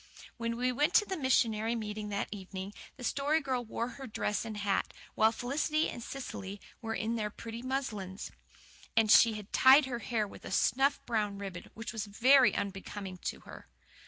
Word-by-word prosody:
When 230 -1 -2
we 250 +1 +1
went 295 +7 +1
to 420 - +6
the 380 - -3
missionary 230 -6 +2
meeting 210 -1 -4
that 200 -1 -2
evening, 195 0 -6 0.2
the 250 - -9
Story 280 +5 +1
Girl 260 -4 -2
wore 235 +1 -3
her - - -10
school 270 -1 -7
dress 210 -1 -2
and 220 -2 -5
hat, 200 -1 0 0.2
while 220 +1 +4
Felicity 300 +6 0
and 240 - -7
Cecily 205 -6 -6 0.2
were 225 -1 -3
in 225 +4 -1
their 210 -1 -1
pretty 230 +2 -8
muslins. 215 -8 -4 0.7
And 220 -2 +5
she 230 -2 +8
had 210 -2 -8
tied 265 +2 +7
her 245 -3 -3
hair 220 -3 -1
with - - -13
a - - -7
snuff 270 +5 +2
brown 210 -4 -1
ribbon 195 -3 -7
which 230 +2 -6
was 220 -2 -3
very 255 +6 +5
unbecoming 195 -1 -5
to - - -3
her. - - -12
225 Hz, 190 wpm, -32 LUFS, 205-260 Hz, 0.7 s, she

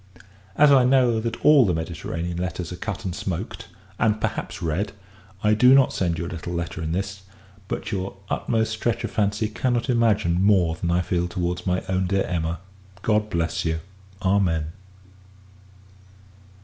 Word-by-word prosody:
As 150 -1 +6
I 135 -2 +6
know 125 -3 +4
that 115 +1 -4
all 150 -3 +8
the 90 -6 +1
Mediterranean 85 +1 -4
letters 90 -1 -4
are - - -7
cut 110 +2 -5
and 90 - -2
smoaked, 90 -4 -5 0.3
and 110 -1 +2
perhaps 100 -4 -3
read, 90 +4 -2 0.5
I 105 0 +4
do 125 +5 +6
not 135 -2 +4
send 85 -3 0
you 85 - -3
a - - -4
little 85 +1 -6
letter 85 -1 -4
in 80 0 -3
this; 95 +2 -3 0.5
but - - -4
your 95 -1 -3
utmost 110 +1 0
stretch 115 +2 -1
of 115 - -3
fancy 105 +1 0
cannot 120 +3 0
imagine 105 -7 +2
more 95 -5 +4
than 85 +1 -3
I 85 +1 +2
feel 90 0 -1
towards 90 0 -3
my 90 0 0
own 95 0 0
dear 95 +1 +1
Emma. 85 -1 -2 0.4
God 105 -1 +1
bless 85 -2 -1
you! 80 -1 -1 0.4
_Amen. 90 -5 +2
95 Hz, 165 wpm, -24 LUFS, 85-110 Hz, 0.5 s, all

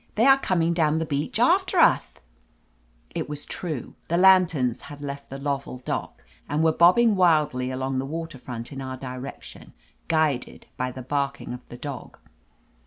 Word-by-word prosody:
"They 225 - +3
are 270 0 +7
coming 170 -8 +1
down 160 -2 +2
the 160 - -1
beach 145 -1 -2
after - - +3
uth - - +3 0.5
!" - - -37
It - - -3
was 145 -1 -6
true. 155 -8 -5
The 170 - +1
lanterns 175 -10 +4
had 145 -2 -10
left 140 -1 -7
the 135 - -6
Lovell 140 -2 -3
dock 125 - -5 0.3
and 150 +2 +1
were 160 - +5
bobbing 190 +8 +5
wildly 150 -8 +2
along 130 0 -2
the 135 - -2
water 160 -2 -5
front 120 0 -7
in 135 - -7
bur 130 -1 -5
direction, 130 +1 -9 0.3
guided 155 -6 0
by 125 0 -2
the 130 0 -8
barking 140 0 -2
of 125 - -7
the 120 - -9
dog. 140 0 -7
140 Hz, 175 wpm, -25 LUFS, 130-165 Hz, 0.5 s, are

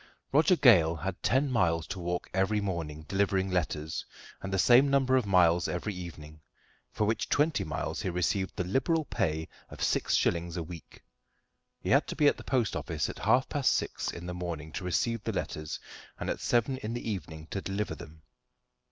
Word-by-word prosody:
Roger 160 +6 +5
Gale 90 - +6
had 90 +3 -5
ten 135 +1 +2
miles 85 -8 +2
to 95 - -6
walk 90 0 -3
every 95 +3 +2
morning, 85 -6 -4
delivering 95 -1 +1
letters, 80 -3 -2 0.4
and 95 - -5
the 95 - +1
same 125 +8 +6
number 135 -1 +3
of 125 -5 +2
miles 90 -3 +4
every 90 +4 -3
evening, 80 -4 -9 0.5
for 105 - 0
which 110 +2 -1
twenty 145 -8 +2
miles 75 -4 -3
he - - -1
received 90 +2 -1
the - - -1
liberal 135 - +1
pay 80 - -1 0.2
of - - -6
six - - +1
shillings 85 0 0
a 85 - -2
week. 85 0 -11 0.8
He - - -3
had - - +4
to - - -4
be 150 - +2
at 145 - +5
the - - -10
post 120 -6 0
office - - -2
at - - -12
half 130 +1 +3
past 140 -3 +2
six - - -2
in 85 - -8
the 90 - -4
morning 85 -3 -5
to 100 - -5
receive 105 +6 0
the - - -2
letters, 75 0 -4 0.4
and - - -2
at - - -4
seven 120 +3 +1
in 115 -2 -4
the 120 - -5
evening 80 -6 -5
to 100 - -2
deliver 100 +2 -2
them. 75 0 -12
95 Hz, 195 wpm, -30 LUFS, 85-115 Hz, 0.8 s, Gale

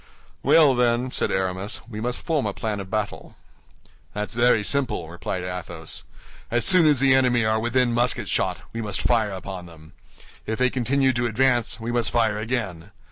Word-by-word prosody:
"Well, 150 -5 +5
then," 125 0 +1
said - - -1
Aramis, 95 +1 -2
"we 110 -2 -7
must 120 +1 -2
form 155 -9 -1
a 100 - -4
plan 105 -2 -3
of 95 -1 -7
battle." 105 0 -4 0.8
"That's 105 0 -3
very 120 -2 +3
simple," 130 - -1
replied 85 +2 -5
Athos. 85 -3 -6 0.4
"As 120 0 +2
soon 180 -4 +7
as 145 -4 +3
the 135 -1 +5
enemy 125 -3 +3
are 110 0 +1
within 120 +1 +1
musket 120 +1 +1
shot, - - -1
we 115 - -3
must 105 -2 -3
fire 115 -3 +2
upon 95 -2 -7
them. 80 -1 -16 0.5
If 110 0 -2
they 125 0 +2
continue 130 +2 +1
to 120 0 0
advance, 120 +1 +1
we 115 +1 -4
must 120 -2 0
fire 110 -3 +1
again. 105 -7 -4
115 Hz, 180 wpm, -24 LUFS, 100-125 Hz, 0.8 s, soon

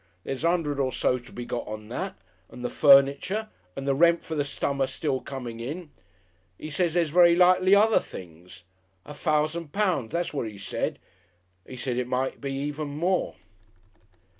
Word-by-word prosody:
There's 135 +2 -5
a 165 - +4
'undred 155 -5 0
or 130 -2 +1
so 125 0 +1
to 125 +1 -16
be 120 - -7
got 120 - -4
on 105 0 -7
that, 120 - -4 0.3
and 125 - -8
the - - -2
furniture 140 +10 +4 0.3
and 135 - -5
the 140 - +2
rent 170 +4 +4
for 160 - -5
the 150 -2 0
summer 140 -1 -1
still 130 0 -2
coming 125 -4 -7
in. 150 +7 -6 0.7
'E 155 - -7
says 170 +2 0
there's 170 -4 +1
very 170 0 +6
likely 185 +2 +5
other 215 +2 +5
things. 90 +1 -12 0.4
A 150 - -9
fousand 155 +1 -1
pounds, 185 - 0
that's 170 0 -2
what 135 -6 -2
'e 105 -2 -9
said. 100 - -3 0.7
'E 130 - -7
said 125 -1 -2
it 125 -1 -1
might 130 +1 0
even 145 +2 -3
be 145 - -7
more."... 180 +4 0
145 Hz, 180 wpm, -26 LUFS, 125-170 Hz, 0.7 s, very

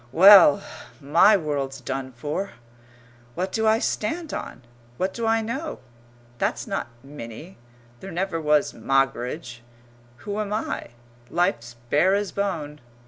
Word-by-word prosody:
Well, 185 -2 +8 0.4
my 170 +9 +5
world's 145 -5 -3
done 135 -1 -4
for! 150 +10 -4 0.8
What 185 +2 -2
do 220 0 0
I 220 0 +5
stand 315 +9 -2
on? - - -6 0.3
What 185 +1 -1
do 230 -1 -2
I 225 0 +3
know? 270 +8 -4 0.6
That's - - -1
not - - -3 0.2
Minnie. 140 +4 -10 0.4
There 195 - -8
never 175 -1 -2
was 150 -1 +2
Moggridge. 125 0 -1 0.6
Who 205 0 -3
am 210 -1 -3
I? 215 - -3 0.4
Life's 160 -10 -1 0.2
bare 185 +7 +4
as 205 -1 -2
bone. 160 -7 -3
170 Hz, 130 wpm, -24 LUFS, 140-205 Hz, 0.8 s, Well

